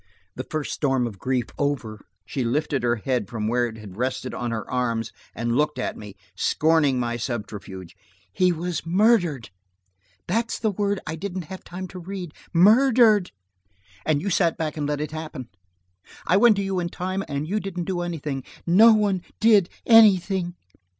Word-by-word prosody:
The 130 - -6
first 155 -2 -3
storm 135 -4 +1
of 105 -5 -7
grief 130 +1 0
over, 125 -7 -2 0.2
she 130 +4 -3
lifted 140 +3 0
her 120 0 +1
head 120 -2 -2
from 110 -3 -3
where 120 +1 +1
it 110 -1 -9
had 105 -3 -11
rested 130 +1 -2
on 120 - -3
her 110 -2 -4
arms 115 -3 -1 0.2
and 120 0 -1
looked 150 0 +1
at 125 - -3
me, 105 -2 -10 0.2
scorning 155 -5 +2
my 120 -1 -1
subterfuge. 105 -6 -6 0.4
"He 185 -1 +3
was 170 -1 -3
murdered. 175 - +2 0.8
That's 230 +1 -1
the 220 -1 0
word 205 0 -1
I 155 - -4
didn't 180 -1 -5
have 190 - -9
time 185 +2 -7
to 185 - -9
read! 180 -2 -7 0.2
Murdered! 215 +1 +5 0.7
And 155 -1 0
you 200 - -1
sat 170 -2 +2
back 155 -2 -3
and 150 -2 -2
let 145 0 -2
it 150 - -4
happen. 155 -6 -7 0.8
I 180 - +3
went 215 +2 +6
to 200 - -1
you 195 -1 -1
in 170 -1 -2
time 185 +3 -3
and 145 +1 -3
you 210 +5 0
didn't 185 -3 -4
do 180 -1 -2
anything. 150 -6 -4 0.2
No 215 +7 +7
one 200 -3 +1 0.2
did 210 -5 +5 0.2
anything!" 195 -5 +5
155 Hz, 175 wpm, -24 LUFS, 125-190 Hz, 0.8 s, No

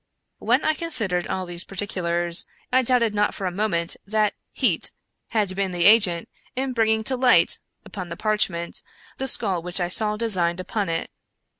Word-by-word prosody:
When - - +1
I 310 - +3
considered 225 - -1
all 185 -1 -3
these 175 0 -2
particulars, 175 -3 0 0.3
I 260 - +5
doubted 240 -3 +2
not 210 0 0
for 195 - -5
a 180 - -1
moment 175 -4 -1
that 210 0 0 0.2
heat - - +1 0.4
had 205 -5 0
been 195 0 -1
the 175 -1 0
agent 200 -6 +5 0.3
in 260 0 -2
bringing 220 -2 +1
to 260 +3 0
light, 250 0 +4 0.3
upon 185 -3 -7
the 170 - -6
parchment, 195 -6 0 0.4
the 265 - -2
skull 195 -8 0
which 180 +2 -2
I 175 -1 -1
saw 210 +3 +3
designed 185 -6 +1
upon 195 +1 -3
it. 165 0 -3
200 Hz, 170 wpm, -23 LUFS, 175-220 Hz, 0.4 s, I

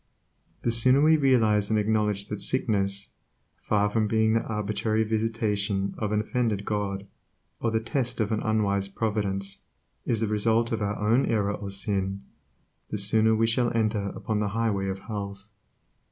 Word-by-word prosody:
The 120 - +1
sooner 125 +4 +6
we 155 +2 +5
realize 115 -8 +3
and 110 - +2
acknowledge 105 -1 0
that 105 -1 -4
sickness, 100 -6 0 0.5
far 105 -1 +1
from 110 +1 0
being 110 0 +2
the 115 - +2
arbitrary 105 +1 -1
visitation 105 -3 -1
of 105 -1 -2
an 105 0 +2
offended 110 -3 -1
God, 100 -2 -2 0.5
or 115 - 0
the 110 0 +1
test 120 +2 -2
of 110 -1 0
an 110 - +1
unwise 100 -3 0
Providence, 100 -2 -2 0.4
is 115 - 0
the 110 - +1
result 110 +2 +1
of 115 - -1
our 100 0 -1
own 115 +6 +2
error 105 -3 +1
or 100 -1 -6
sin, 100 0 -2 0.7
the - - -3
sooner 110 +2 +3
shall 120 +1 +1
we 115 - -6
enter 110 -2 0
upon 110 -4 -2
the 105 - 0
highway 105 -4 0
of 95 0 -2
health. 100 -1 -6
105 Hz, 165 wpm, -26 LUFS, 100-115 Hz, 0.7 s, sooner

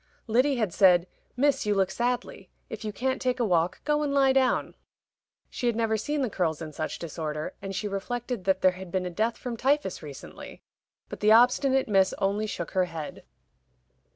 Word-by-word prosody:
Lyddy 255 +5 +2
had 215 -8 -1
said, 180 -3 +5 0.3
"Miss, 275 -3 +2
you 205 - +2
look 190 -1 +1
sadly; 240 -3 -3 0.2
if 220 0 -6
you 215 - -3
can't 260 +5 -2
take 255 0 0
a 240 - +2
walk, 175 -3 +1
go 300 0 +2
and 295 -1 -1
lie 270 -1 +4
down." 260 -1 +1 0.7
She 245 - -3
had 235 - +1
never 225 -1 +1
seen 285 +7 -1
the 250 - 0
curls 165 -5 -1
in 155 -2 -7
such 155 +1 -4
disorder, 155 -2 -5
and 195 0 -5
she 210 - -2
reflected 235 +2 -4
that 190 -1 +2
there 185 - +6
had 185 -1 -10
been 185 0 -1
a 180 - -4
death 220 +6 -1
from 240 -2 -5
typhus 275 -5 0
recently. 145 -4 -10 0.4
But - - -8
the 210 +1 +4
obstinate 255 +3 +4
Miss 195 -3 +3
only 205 +2 0
shook 170 -5 -5
her 185 -1 +2
head. 165 -3 -7
215 Hz, 195 wpm, -27 LUFS, 185-250 Hz, 0.7 s, there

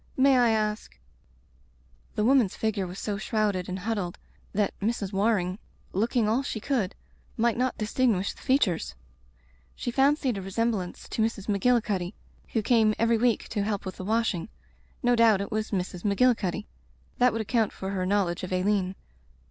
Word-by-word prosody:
May 270 0 +5
I 245 -2 +5
ask 215 - -1 0.6
" - - -34
The 210 - +1
woman's 250 -6 +4
figure 210 -4 -1
was 180 +2 -8
so 200 0 -3
shrouded 210 -5 0
and 185 - -3
huddled 195 -3 -3 0.3
that 205 -1 0
Mrs. 205 -2 -2
Waring, 195 -2 +1 0.3
looking 225 +3 +1
all 230 +5 +2
she 270 -5 -4
could, 225 -6 -1 0.4
might 235 0 +2
not 255 +1 0
distinguish 215 -3 +1
the - - -17
features. 260 - +1 0.8
She 240 - -3
fancied 270 -3 +2
a - - -5
resemblance 195 -1 -2
to - - -2
Mrs. 220 -3 -1
Magilli 225 +3 +3
cuddy 190 -2 -2 0.4
who 225 - +1
came 220 -2 +4
every 230 0 +2
week 240 -1 +1
to 210 - -1
help 205 -1 -2
with 190 - -6
the - - -6
washing. 215 -3 0 0.5
No 245 0 +4
doubt 225 -4 +5
it 200 +4 -4
was 215 0 -1
Mrs. 180 -2 -3
Magilli 245 +5 +4
cuddy. 185 -5 -3 0.5
That 250 0 +5
would 225 +1 -2
account 220 0 +1
for 190 0 -5
her 190 -2 -1
knowl 195 -1 +2
edge 175 +2 -4
of 185 - -5
Aileen. 185 0 +1
215 Hz, 175 wpm, -27 LUFS, 190-230 Hz, 0.8 s, May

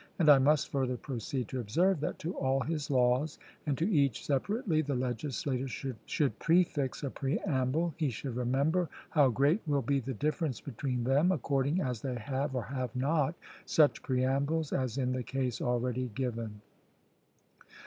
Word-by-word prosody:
And 155 -4 +6
I 140 - +8
must 145 +2 +3
further 130 -2 0
proceed 125 -1 -4
to 130 - -3
observe, 165 - +2
that 150 - -2
to 175 - -1
all 135 0 +1
his 150 +1 -2
laws, 130 +3 +2 0.3
and 140 -3 +1
to 165 - +1
each 140 - +2
separately, 160 - +1
the 145 -3 -2
legislator 130 +1 -2
should 135 +2 -2
prefix 165 -7 +2
a 140 - -2
preamble; 140 +2 0
he 155 -4 +1
should 125 +1 -5
remember 140 +8 +1 0.2
how 145 -4 +5
great 140 - +2
will 140 -2 +1
be 140 +3 +1
the 130 0 -4
difference 150 - -1
between 125 -2 -3
them, 140 +8 +3
according 140 0 +1
as 125 -7 -2
they 130 -2 -3
have, 130 +4 -2
or 125 - -1
have 125 +1 -4
not, 150 +4 +1 0.3
such 150 -2 +4
preambles, 140 +4 0
as 130 -2 -1
in 130 -2 0
the 130 0 -1
case 130 -1 -2
already 125 +1 0
given. 115 -5 -3
135 Hz, 160 wpm, -31 LUFS, 125-150 Hz, 0.3 s, I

